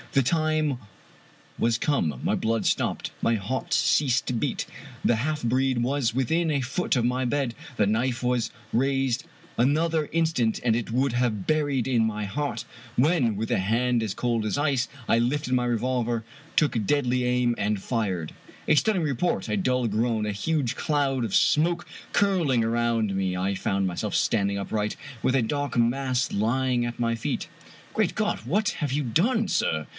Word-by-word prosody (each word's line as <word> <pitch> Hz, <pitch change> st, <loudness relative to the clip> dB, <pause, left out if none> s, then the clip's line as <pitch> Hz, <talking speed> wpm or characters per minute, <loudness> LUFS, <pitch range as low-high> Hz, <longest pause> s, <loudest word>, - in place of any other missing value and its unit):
The 140 Hz, -, +5 dB
time 155 Hz, -1 st, +1 dB, 0.8 s
was 115 Hz, 0 st, +2 dB
come. 85 Hz, -, 0 dB
My -, -, +1 dB
blood 115 Hz, 0 st, 0 dB
stopped, -, -, 0 dB
my 115 Hz, -, +2 dB
heart 110 Hz, +6 st, -3 dB
ceased 135 Hz, -3 st, +3 dB
to -, -, -1 dB
beat. 115 Hz, -, -1 dB, 0.4 s
The 120 Hz, -, +4 dB
half 150 Hz, +5 st, -1 dB
breed 130 Hz, +1 st, +1 dB
was 125 Hz, -2 st, 0 dB
within 160 Hz, +6 st, +1 dB
a 145 Hz, -, +1 dB
foot 140 Hz, +3 st, -1 dB
of 120 Hz, -, +1 dB
my 125 Hz, +1 st, 0 dB
bed, 130 Hz, -1 st, 0 dB, 0.2 s
the 105 Hz, -, +3 dB
knife 120 Hz, +4 st, 0 dB
was 125 Hz, -2 st, 0 dB, 0.2 s
raised, 135 Hz, +1 st, +1 dB, 0.3 s
another 155 Hz, +6 st, +2 dB
in 165 Hz, +2 st, +1 dB
stant 120 Hz, -9 st, 0 dB
and 115 Hz, -2 st, +3 dB
it 115 Hz, -1 st, -3 dB
would 130 Hz, +1 st, +1 dB
have 120 Hz, -5 st, 0 dB
been 155 Hz, -, +4 dB
buried 140 Hz, -5 st, 0 dB
in 120 Hz, -4 st, +2 dB
my 105 Hz, -1 st, -1 dB
heart, 145 Hz, +9 st, -3 dB, 0.3 s
when, 125 Hz, -, +3 dB
with 110 Hz, +2 st, -3 dB
a -, -, +2 dB
hand 115 Hz, +4 st, +1 dB
as 105 Hz, -3 st, -2 dB
cold 120 Hz, -2 st, 0 dB
as 110 Hz, +5 st, -1 dB
ice, 140 Hz, -3 st, +1 dB, 0.2 s
I -, -, +4 dB
lifted 130 Hz, +3 st, 0 dB
my 125 Hz, -1 st, +2 dB
revolver, 120 Hz, -1 st, -1 dB, 0.3 s
took 130 Hz, -8 st, +2 dB
deadly 125 Hz, -1 st, +1 dB
aim, 125 Hz, -1 st, +2 dB
and 105 Hz, -1 st, -1 dB
fired! 95 Hz, -10 st, -2 dB, 0.3 s
A 155 Hz, -, +5 dB
stunning 190 Hz, +2 st, +2 dB
report, 150 Hz, +4 st, 0 dB
a -, -, 0 dB
dull 125 Hz, -, +1 dB
g^oan, 110 Hz, 0 st, 0 dB
a 105 Hz, -, -1 dB
huge 135 Hz, +4 st, -1 dB
cloud 140 Hz, -4 st, 0 dB
of 110 Hz, -4 st, -3 dB
smoke 170 Hz, +3 st, +3 dB, 0.2 s
curling 165 Hz, -, +2 dB
around 115 Hz, -3 st, +1 dB
me, 95 Hz, -1 st, 0 dB
and 90 Hz, -, -2 dB
I 100 Hz, +1 st, 0 dB
found 95 Hz, 0 st, 0 dB
myself 90 Hz, -, -3 dB
standing 100 Hz, -3 st, +1 dB
upright, 105 Hz, +1 st, -2 dB, 0.3 s
with 130 Hz, -, +2 dB
a -, -, +3 dB
dark 145 Hz, +3 st, -2 dB
mass 125 Hz, +2 st, +1 dB
lying 120 Hz, +3 st, +1 dB
at 120 Hz, 0 st, -5 dB
my 115 Hz, -1 st, +1 dB
feet. 115 Hz, -, -3 dB, 0.5 s
"Great -, -, +1 dB
God! -, -, 0 dB
what 185 Hz, -, 0 dB
have 145 Hz, -, -1 dB
you 145 Hz, +2 st, 0 dB
done, 215 Hz, -, +1 dB
sir?" 80 Hz, -, 0 dB
125 Hz, 180 wpm, -26 LUFS, 115-145 Hz, 0.8 s, The